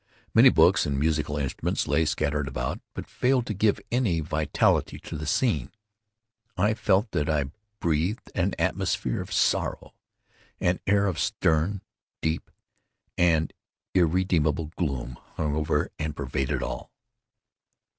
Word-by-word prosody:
Many - - +8
books - - +4
and 70 -1 -1
musical 75 -1 0
instruments 70 -3 -1
lay 80 - +2
scattered 75 -1 0
about, 60 -1 -3
but - - -5
failed 125 -1 +1
to 110 - -3
give 105 +1 +2
any 115 -9 +1
vitality 80 -1 +1
to - - -7
the 80 0 -5
scene. 80 - +1 0.9
I 105 +4 +3
felt 105 0 +1
that 75 - 0
I 75 -3 0 0.3
breathed 85 +6 -1
an - - 0
atmosphere 60 - 0
of - - -8
sorrow. - - 0 0.7
An 90 0 +1
air 100 0 +4
of 90 -5 -1
stern, 90 0 +1 0.4
deep, 80 +1 -2 0.7
and 80 -3 +2 0.4
irredeemable 85 -3 +2
gloom 65 -7 -3 0.2
hung 75 -2 -1
over 75 0 0
and 75 -1 -3
pervaded 65 -1 -2
all. - - -5
80 Hz, 130 wpm, -26 LUFS, 75-95 Hz, 0.9 s, Many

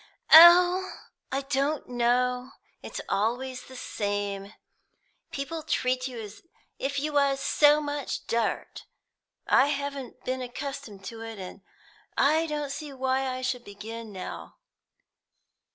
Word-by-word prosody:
"Oh, 355 +3 +9 0.4
I 270 +1 0
don't 280 +2 -1
know; 250 +1 0 0.3
it's - - -7
always 250 +5 -1
the 260 - -13
same; 205 -3 -3 0.8
people 315 +4 -4
treat 255 -3 0
you 250 -3 -7
as 210 -1 -9 0.4
if 280 +1 -1
you 300 +1 -3
was 280 -1 +2
so 295 +2 +4
much 290 -2 -4
dirt. 230 -1 -2 0.6
I 265 - +5
haven't 280 -3 -4
been 255 0 -2
accustomed 250 -5 -7
to 225 +1 -7
it, 225 -1 -7
and 190 +1 -9 0.6
I 315 +3 +3
don't 295 -2 -3
see 285 +1 -6
why 265 0 0
I 255 0 -4
should 250 -1 -2
begin 220 +2 -8
now. 185 -2 -8
260 Hz, 125 wpm, -27 LUFS, 230-285 Hz, 0.8 s, Oh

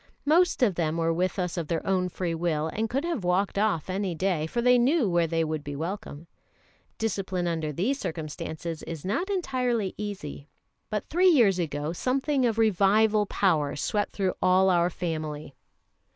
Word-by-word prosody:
Most 325 -1 +3
of 210 -6 +4
them 165 -2 -1
were 165 0 +1
with 180 +4 -1
us 180 -1 -2
of 165 -3 -2
their 165 0 -2
own 185 -1 +1
free 175 -1 -3
will, 160 -2 -1
and 220 +6 -2
could 270 +5 -1
have 330 - -2
walked 190 +3 +1
off 205 -7 +1
any 190 -1 -2
day, 170 -3 0
for 235 - -3
they 250 +1 +5
knew 265 +1 +3
where 170 -2 +2
they 165 0 0
would 155 -2 -3
be 145 0 -6
welcome. 165 -1 -5 0.7
Discipline 190 -4 -2
under 160 -3 -2
these 220 - -1
circumstances 160 - -5
is 165 -1 -7
not 335 - -1
entirely 250 - -1
easy. 190 -8 -6 0.4
But 210 -1 -3
three 365 +3 +5
years 225 - +4
ago 150 -1 -2
something 265 - +1
of 225 -1 -1
Revival 210 0 +3
Power 155 -10 +1
swept 205 +7 -1
through 190 -2 0
all 185 +1 +4
our 175 0 +3
family. 155 -4 -4
185 Hz, 175 wpm, -27 LUFS, 165-220 Hz, 0.7 s, they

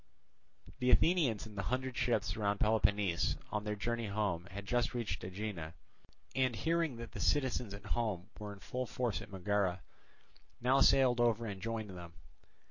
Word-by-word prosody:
The 125 - +2
Athenians 155 - +4
in 110 - -10
the 100 - -3
hundred 130 0 -1
ships 115 -5 +1
round 100 -2 0
Peloponnese 100 -4 +2
on 105 0 -1
their 105 0 -1
journey 115 +2 -2
home 100 -4 -1
had 100 0 -7
just 120 +4 0
reached 120 -4 -2
Aegina, 90 -4 -5 0.6
and 130 -2 +2
hearing 160 +4 +1
that 115 0 -8
the - - -7
citizens 125 -7 +1
at 100 0 -12
home 105 -3 -2
were 105 -1 -5
in 100 - -9
full 125 0 -3
force 125 -4 -1
at - - -10
Megara, 95 -2 0 0.8
now 130 +3 +3
sailed 130 -3 +5
over 115 -1 +3
and 100 -3 -5
joined 110 -3 -3
them. 85 -2 -9
110 Hz, 165 wpm, -34 LUFS, 100-125 Hz, 0.8 s, sailed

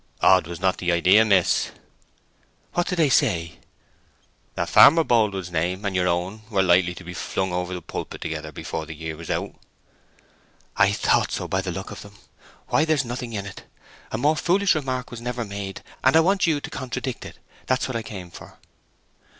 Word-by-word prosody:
"Odd 95 -3 +5
was 85 -1 -7
not 95 0 +1
the 90 -1 0
idea, 90 +5 +5
miss." 100 -5 +2 1.0
"What 175 - 0
did 180 - -1
they 160 -4 +3
say?" 85 - +1 1.0
"That - - -1
Farmer 165 +3 +7
Boldwood's 100 - +1
name 90 +5 -1
and 100 -1 -1
your 90 -1 +2
own 90 +5 -1
were 100 -4 +2
likely 90 -1 +3
to 90 - -10
be 90 +1 -8
flung 95 +1 -3
over 90 0 -3
pulpit - - -6
together 75 -1 -5
before 80 +1 -5
the 80 - -7
year 80 +1 -6
was 85 +1 -10
out." - - -2 1.2
"I - - +4
thought - - +1
so - - -3
by 95 - 0
the 95 -1 -4
look 95 +3 -6
of - - -8
them! 100 0 -13 0.5
Why, 155 - +3
there's 155 -4 +1
nothing 120 0 -5
in 100 -2 -4
it. 100 - -10 0.5
A - - -2
more 145 +6 +2
foolish 190 +5 +2
remark 130 -5 -3
was 120 -1 -8
never 125 -1 -3
made, 100 -1 -6 0.2
and 130 +3 +4
I - - +8
want 190 +2 +2
you 155 -3 +2
to - - -7
contradict 130 0 -5
it: - - -10 0.3
that's 130 0 +1
what 130 - -5
I 115 - -1
came 95 -5 -9
for." - - -13
100 Hz, 190 wpm, -24 LUFS, 90-130 Hz, 1.2 s, I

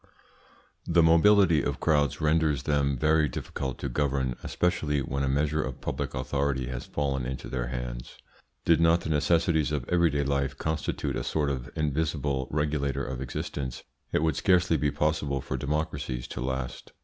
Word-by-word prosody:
This 85 0 +4
mobility 85 0 +5
of - - -2
crowds 75 -5 +2
renders 75 -3 +2
them 70 -2 +1
very 75 +2 +3
difficult 65 +1 -4
to - - -4
govern, 65 -1 0
especially 80 -5 0
when 70 +2 -2
a 70 - +1
measure 75 +3 +1
of 65 -3 -5
public - - -3
authority 65 0 -1
has 60 -1 -5
fallen 70 -3 -1
into 65 0 -5
their 60 -2 -2
hands. - - -6 0.5
Did 85 0 +4
not 85 +1 +4
the 80 - -3
necessities 80 0 +2
of 70 -5 -2
everyday 85 -5 +2
life 70 0 -1
constitute 80 -1 -2
a - - -2
sort 75 -2 0
of 65 0 -4
invisible 75 -3 -1
regulator 75 -2 -1
of 65 0 -5
existence, 65 0 -4 0.3
it - - +1
would 80 -1 +2
scarcely 90 -3 +3
be 75 -1 +1
possible 75 -2 0
for 65 - -4
democracies 70 -3 -2
to - - -5
last. 65 -1 -4
70 Hz, 160 wpm, -28 LUFS, 65-80 Hz, 0.5 s, mobility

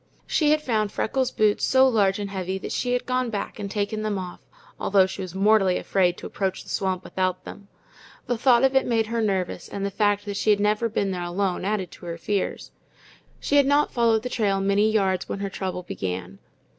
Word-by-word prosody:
She 305 -2 +2
had 305 0 +2
found 215 -5 0
Freckles' 260 +2 0
boots 210 -1 +1
so 265 0 +5
large 200 -6 +2
and 200 -1 -5
heavy 190 -1 -3
that - - -7
she 245 -1 -1
had 250 - -1
gone 255 -1 0
back 210 0 -5
and 200 -1 -4
taken 210 +1 -2
them 215 -2 -1
off, 180 -1 -6 0.4
although 195 -1 +4
she 190 +1 -6
was 185 -1 -7
mortally 195 -2 +3
afraid 180 -2 +1
to - - -9
approach 190 -2 -3
the - - -14
swamp 190 -1 -1
without 185 -1 -2
them. 200 - -10 0.6
The 245 - 0
thought 240 +1 +4
of 270 0 +3
it 265 - +3
made 225 -2 +2
her 230 +1 -2
nervous, 190 -4 -2
and 200 0 -4
the 200 - -2
fact 205 0 +1
that 200 -1 -4
she 210 0 +3
never 210 +3 +1
had 220 - -13
been 195 -1 +1
there 180 -1 -3
alone 180 +2 -2
added 195 -3 -2
to 175 - -11
her 170 0 -4
fears. 200 +3 -3 0.7
She 285 - +1
had 280 -1 +5
not 290 +1 +3
followed 230 -2 +2
the 250 - -3
trail 205 -5 0
many 205 +3 +2
rods 190 -2 0
when - - -3
her 200 0 -4
trouble 185 -1 -4
began. 95 - -5
205 Hz, 220 wpm, -24 LUFS, 190-225 Hz, 0.7 s, so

